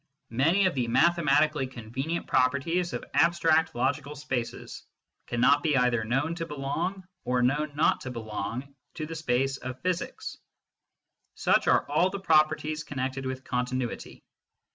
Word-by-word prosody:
Many 165 +12 +3
of 185 - +2
the 125 -3 -1
mathematically 150 -1 +3
convenient 130 +7 -4
properties 140 +7 +1
ol - - -3
abstract 165 -2 +3
logical 140 +4 -1
spaces 130 -4 -4 0.5
cannot 130 +5 +3
be 150 -3 +2
either 125 -2 +2
known 135 +8 0
to 165 -1 -5
belong 165 +7 -3 0.2
or 125 0 +1
known 145 +3 0
not 150 - +2
to 130 - -6
belong 120 +3 -5 0.2
to 155 - -4
the 165 - -7
space 135 -3 0
of 130 0 -7
physics. 180 -1 -3 1.0
Such - - +2
are - - +3
all 155 +6 +2
the 200 +1 -5
properties 155 -2 +2
connected 135 -1 -3
with 130 0 -5
continuity. 125 -1 -3
140 Hz, 140 wpm, -28 LUFS, 130-160 Hz, 1.0 s, Many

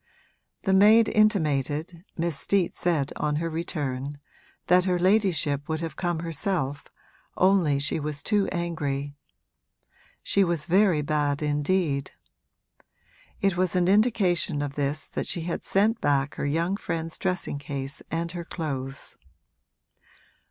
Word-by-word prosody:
The 190 - +2
maid 215 +3 +6
intimated, 165 - +1
Miss 170 -1 -1
Steet 185 +5 +1
said 155 -6 -1
on 150 0 0
her 165 +2 -2
return, 145 -4 -3 0.5
that 180 +1 +4
her 180 -2 +2
ladyship 175 -7 +1
would 160 0 -1
have 165 -3 -4
come 175 -2 -2
herself, 165 -3 -2 0.5
only 185 -6 +3
she 145 +3 0
was 150 -1 -4
too 205 -2 +1
angry. 145 -5 -3 1.1
She 200 - +3
was 170 -4 0
very 180 -3 +3
bad 145 -1 0
indeed. 150 -1 0 1.3
It 195 -2 +2
was 185 0 0
an 180 -1 +3
indication 190 -8 +2
of 140 -1 -4
this 145 +2 -2
that - - -4
she 170 - -1
had 170 +1 -4
sent 220 +4 +1
back 140 0 +1
her - - -3
young 170 +6 0
friend's 165 -4 -4
dressing 180 -6 -2
case 140 -1 -5
and 165 +1 -2
her 175 -1 -5
clothes. 135 -5 -5
165 Hz, 130 wpm, -26 LUFS, 145-185 Hz, 1.3 s, maid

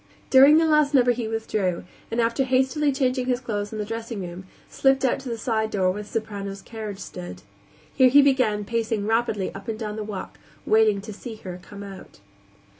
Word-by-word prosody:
During 275 +3 +8
the 325 - +4
last 300 -2 +3
number 250 -2 +5
he 240 -2 -2
withdrew 215 -5 -2 0.3
and, 230 - -2
after 235 +3 +2
hastily 265 +3 +2
changing 255 -2 0
his 250 -1 +1
clothes 210 -5 -4
in 220 - -5
the 210 - -2
dressing 225 -1 -5
room, 180 +1 -7 0.2
slipped 270 0 +2
out 255 - +1
to 265 -2 -7
the 230 - -3
side 220 -2 -1
door 190 -3 +1
where 205 +3 -5
the 210 - -12
soprano's 200 -3 -5
carriage 215 -3 -7
stood. 90 - -8 0.5
Here 260 -1 +5
he 285 +3 +7
began 255 -7 +2
pacing 225 -1 -1
rapidly 220 -3 0
up 195 +3 -10
and 225 -1 -3
down 215 -1 -5
the 215 - -3
walk, 205 -3 -7 0.3
waiting 215 -2 +3
to 215 +1 -8
see 225 +3 -8
her 185 -4 -8
come 200 +2 -10
out. 195 -1 -11
220 Hz, 200 wpm, -24 LUFS, 205-255 Hz, 0.5 s, During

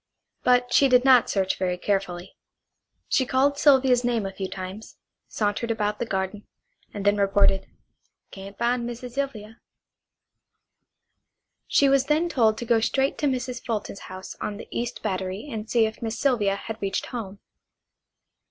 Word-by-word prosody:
But 245 0 +2
she 275 - +6
did 250 0 +4
not 255 -3 +6
search 190 -2 0
very 180 -1 0
carefully. 190 -2 -2 0.7
She 265 - +2
called 270 +3 +1
Sylvia's 265 -3 +5
name 235 -4 0
a 195 - -5
few 190 -1 -5
times, 190 +3 -8 0.3
sauntered 210 +2 -2
about 210 -2 -1
the 240 - -2
garden, 190 +1 -3 0.4
and 205 -1 -6
then 205 0 +4
reported: 195 -1 +2 0.6
"Can't 195 +1 -10
find 240 +1 0
Missy 240 +1 -6
Sylvia." 235 -4 -5 2.1
She 280 - +4
was 270 -1 +3
then 315 +3 +2
told 225 -8 +2
to 240 - -5
go 230 0 +3
straight 270 +4 0
to 295 - +1
Mrs. 255 -1 -3
Fulton's 215 -4 -4
house 185 0 -8
on 205 - -3
the - - -10
East 235 0 -4
Battery 190 +3 -3
and 220 -1 -5
see 230 -2 +3
if 220 0 -5
Miss 225 0 -3
Sylvia 220 -8 +2
had 220 +2 -7
reached 195 -1 -2
home. 210 -6 -6
225 Hz, 155 wpm, -25 LUFS, 200-250 Hz, 2.1 s, she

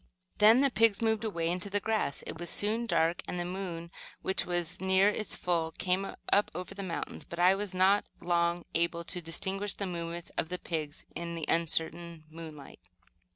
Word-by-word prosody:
Then 220 +4 +8
the 280 -1 +4
pigs 225 -4 +4
moved 220 -1 +1
away 170 -7 -1
into 180 +3 -2
the 205 +1 +1
grass. 215 -8 -1
It - - -6
was 175 - -3
soon 225 +3 +2
dark, 165 -4 +2
and 180 - -3
the 175 - -1
moon, 175 -2 -5 0.3
which 190 - 0
was 175 0 -2
near 190 +1 +5
its 210 0 -1
full, 165 -2 0
came 185 +2 0 0.3
up 205 - +4
over 180 +1 -5
the 200 - -5
mountains; 185 -4 -4
but 170 - -9
I 180 +2 +6
was 195 -1 -3
not 190 +2 +4
long 170 0 +1
able 170 0 +1
to 180 +1 +1
distinguish 190 +4 -2
the 200 - -3
movements 170 -1 -5
of 160 - -1
the 180 - -1
pigs 155 -4 -4
in 170 0 -4
the 165 -2 -3
uncertain 165 0 0
moonlight. 155 -3 -10
180 Hz, 190 wpm, -31 LUFS, 170-195 Hz, 0.3 s, Then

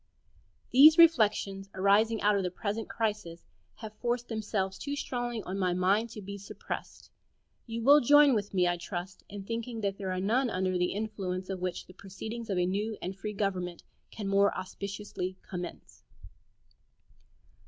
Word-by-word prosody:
These 300 +5 +8
reflections, 210 -11 +4
arising 205 +3 +3
out 210 0 +4
of 200 - +1
the 180 - -1
present 205 +4 -4
crisis, 210 -7 -3 0.3
have 215 -1 -9
forced 240 0 -2
themselves 205 -4 -2
too 285 0 -3
strongly 245 -5 -3
on 190 +2 -4
my 180 -2 +1
mind 200 +5 +2
to 210 -2 -9
be 200 +1 -7
suppressed. 200 - -8 0.6
You 230 0 -4
will 285 +4 +8
join 290 +2 +6
with 205 -3 -1
me, 180 -2 +2
I 175 0 +1
trust, 180 +1 -6
in 200 -1 -7
thinking 230 +2 -4
that 200 -1 -2
there 190 -2 -3
are 185 - -2
none 235 +7 +1
under 185 -2 -1
the 180 0 +1
influence 195 -3 -4
of 190 - -4
which 180 -1 -3
the 185 - -15
proceedings 220 +5 -7
of 195 - 0
a 180 - +2
new 205 +4 -2
and 185 +2 -5
free 210 +2 -5
government 185 -4 -2 0.3
can 205 -3 -6
more 200 +1 +4
auspiciously 190 0 -5
commence. 180 -2 -7
200 Hz, 165 wpm, -30 LUFS, 185-225 Hz, 0.6 s, These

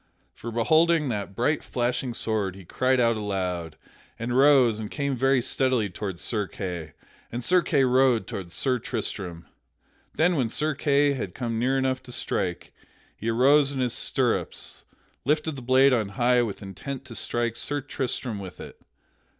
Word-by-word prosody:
For 115 - -7
beholding 155 +6 +3
that 100 -3 -4
bright 145 +7 +1
flashing 125 0 -1
sword 105 -5 -1
he 95 -2 -12
cried 130 +7 +1
out 115 -2 +3
aloud 90 -6 -3 0.4
and 115 +2 -4
arose 130 -4 +5
and 105 -1 -5
came 140 -2 -2
very 135 0 +2
steadily 130 -5 +1
toward 95 -2 -5
Sir 105 -1 -1
Kay, 90 -6 -6 0.4
and 120 +1 -4
Sir 180 +7 +4
Kay 145 -5 +2
rode 130 -2 +3
toward 90 -3 -6
Sir 125 +5 0
Tristram. 100 -7 -5 0.7
Then 175 +2 +3
when 125 -5 +1
Sir 155 +6 0
Kay 145 0 +2
had 110 -9 -5
come 115 -3 -2
near 130 +3 +1
enough 130 -1 0
to 130 -1 -12
strike, 90 -7 -2 0.4
he 115 - -3
arose 140 +4 +4
in 135 - -3
his 125 -2 0
stirrups - - -1
and - - -34 0.3
lifted 150 +2 0
the 135 - -7
blade 130 +2 +5
on 110 -5 +1
high 125 +3 +3
with 105 -4 -4
intent 125 +8 -7
to 125 - -10
strike 120 0 -1
Sir 145 0 -2
Tristram 130 -5 -3
with 95 -2 -9
it. - - -11
125 Hz, 170 wpm, -26 LUFS, 105-135 Hz, 0.7 s, arose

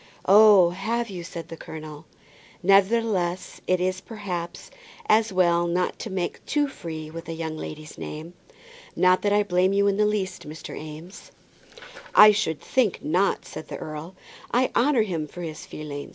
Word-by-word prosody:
"Oh, 200 -3 +7
have 225 +5 -2
you?" 180 -2 -6
said 170 -1 -8
the 165 - -7
colonel. 155 -1 -9 0.6
"Nevertheless 195 -2 +2
it 185 0 +2
is, 185 +1 -1
perhaps, 180 -6 -6 0.4
as 220 0 +3
well 175 -2 +3
not 180 +1 -1
to 225 - -5
make 190 -2 -3
too 295 -1 +1
free 160 - -7
with 165 +1 -8
a - - -3
young 160 -1 -4
lady's 155 0 -8
name. 160 +3 -7 0.6
Not 185 0 +4
that 205 - +1
I 205 0 +4
blame 185 0 +2
you 200 0 +3
in 200 -1 +2
the 210 0 +3
least, 195 -7 -3
Mr. 155 0 -8
Eames." 155 +5 -10 0.8
"I 210 0 +10
should 200 -8 -1
think 245 -7 0
not," 185 +6 +1
said 155 - -9
the - - -6
earl. 155 +4 -7 0.4
"I 255 +1 +2
honour 250 -2 +3
him 165 -7 -3
for 175 +4 -9
his 155 -2 -7
feeling. 145 -2 -7
180 Hz, 165 wpm, -25 LUFS, 160-205 Hz, 0.8 s, I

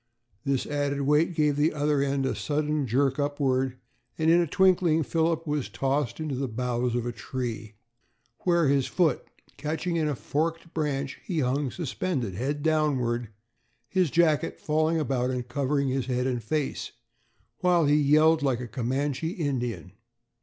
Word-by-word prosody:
This 140 -2 0
added 145 -1 -1
weight 150 +5 +2
gave 150 -2 +2
the 150 +2 +2
other 145 -1 +1
end 140 -1 0
a 130 - 0
sudden 150 -1 -1
jerk 135 +4 +1
upward, 135 -3 0 0.4
and 160 +1 +3
in 170 +1 +5
a 170 - 0
twinkling 175 -2 +3
Philip 165 +2 0
was 150 -3 -2
tossed 135 0 -1
into 155 -3 -3
the 135 +1 -2
boughs 120 +1 -1
of 120 - 0
the 120 - -2
tree, 115 -4 -5 0.6
where, 170 -3 +2
his 135 -1 +2
foot 165 -7 +1 0.3
catching 160 +4 -2
in 155 -2 +1
a 150 - -1
forked 165 +5 -2
branch, 140 -3 -2
he 170 -5 -1
hung 135 +2 0
suspended, 140 - -3
head 140 +8 -2
downward, 130 -7 +1 0.6
his 185 -4 +2
jacket 165 0 +2
falling 155 +1 +1
about 130 -4 0
and 125 -1 -3
covering 140 +2 0
his 130 -1 -1
head 125 -1 0
and 125 -2 -1
face, 145 +6 -2 0.7
while 175 -3 +3
he 145 +1 +4
yelled 155 +2 +4
like 135 -4 +1
a 125 - -5
Comanche 135 +6 -2
Indian. 125 - -3
145 Hz, 160 wpm, -27 LUFS, 130-155 Hz, 0.7 s, in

